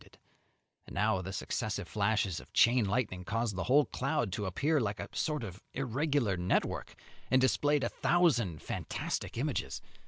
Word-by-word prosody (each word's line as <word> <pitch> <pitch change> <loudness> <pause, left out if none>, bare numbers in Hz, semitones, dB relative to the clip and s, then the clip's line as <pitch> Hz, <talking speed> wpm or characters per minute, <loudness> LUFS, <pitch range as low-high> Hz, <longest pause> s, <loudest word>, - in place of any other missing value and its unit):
And - - -10
now 105 -2 +2
the 95 +1 -5
successive 100 +1 -3
flashes 105 -3 0
of - - -15
chain 120 -1 +5
lightning 100 -3 -1
caused 115 +1 -1
the 95 - -2
whole 140 +3 +5
cloud 120 -6 -1
to 100 +2 -2
appear 145 - +1
like 105 -4 -2
a - - -5
sort 150 -4 -1
of 95 -2 -7
irregular 135 -4 0
network, 90 +1 -1 0.3
and 130 - +5
displayed 145 +2 +2
a - - +1
thousand 120 - +2
fantastic - - -3
images. - - -2
110 Hz, 155 wpm, -32 LUFS, 95-135 Hz, 0.3 s, chain